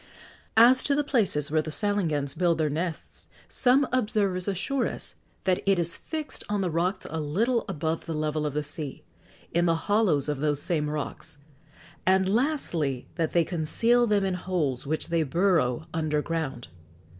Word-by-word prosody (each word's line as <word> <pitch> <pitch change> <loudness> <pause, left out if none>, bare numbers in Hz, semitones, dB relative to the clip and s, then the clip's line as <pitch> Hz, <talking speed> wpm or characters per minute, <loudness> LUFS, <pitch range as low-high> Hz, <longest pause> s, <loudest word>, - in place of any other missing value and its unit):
As 250 +3 +7
to 280 - +2
the 295 - +1
places 195 - +1
where 155 0 +3
the 155 - -6
salangans 155 -5 0
build 175 -2 +2
their 155 -2 0
nests, 165 +2 -4 0.2
some 260 +2 +3
observers 210 -7 +1
assure 225 +8 0
us - - -4 0.3
that 185 -1 +1
it 195 -1 +4
is 170 -1 0
fixed 310 -2 -5
on 205 -1 0
the 180 -3 -1
rocks 180 +4 -1
a 160 - -4
little 220 - 0
above 160 -2 -2
the 165 - -2
level 155 0 -1
of 145 - -5
the 150 - 0
sea; 145 -1 -5 0.5
in 170 +1 +2
the 165 - +3
hollows 205 -10 +2
of 145 -2 -2
those 145 -1 +1
same 150 -3 0
rocks; 150 -1 -5 0.7
and, 190 0 +3
lastly, 190 - 0
that 165 -2 -2
they 170 - +4
conceal 230 +9 +2
them 205 -2 +2
in 190 - 0
holes 165 -8 -2
which 155 +2 -2
they 170 -1 +2
burrow 160 -3 +1
under 155 -2 0
ground. 155 - -3
170 Hz, 170 wpm, -27 LUFS, 150-205 Hz, 0.7 s, As